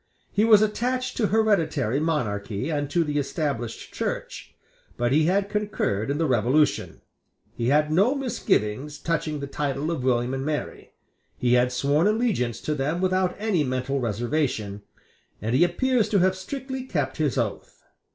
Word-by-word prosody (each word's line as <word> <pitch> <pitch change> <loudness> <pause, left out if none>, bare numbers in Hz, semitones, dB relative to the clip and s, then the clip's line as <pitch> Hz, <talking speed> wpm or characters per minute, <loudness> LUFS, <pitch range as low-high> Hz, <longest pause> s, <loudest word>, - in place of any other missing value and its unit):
He 205 - +2
was 215 -2 +7
attached 250 +4 -1
to 220 - +2
hereditary 165 - +1
monarchy 120 -5 -2
and 145 -2 -1
to 170 +3 +2
the 150 -1 -1
Established 140 -4 -3
Church; - - -4 0.4
but 120 0 0
he 155 +3 +4
had 195 +3 +2
concurred 205 - -1
in 140 - 0
the 165 - +1
Revolution; 130 +3 +1 0.5
he 115 - -2
had 150 +3 +3
no 200 - +3
misgivings 150 - -1
touching 155 -3 -2
the - - -3
title 140 +2 -2
of 150 -7 -3
William 125 0 +1
and 135 0 -2
Mary; 150 0 -4 0.4
he 125 -1 +2
had 125 0 +3
sworn 140 +7 +2
allegiance 210 - 0
to 155 - -1
them 150 +4 -1
without 185 0 +1
any 205 -7 +1
mental 130 +1 -1
reservation; 115 -3 -1 0.6
and 110 +2 -2
he 135 - +5
appears 225 +6 +1
to 210 - +2
have 185 0 +3
strictly 265 +7 -5
kept 145 - -2
his 150 -4 0
oath. 110 -5 -3
150 Hz, 160 wpm, -25 LUFS, 125-190 Hz, 0.6 s, was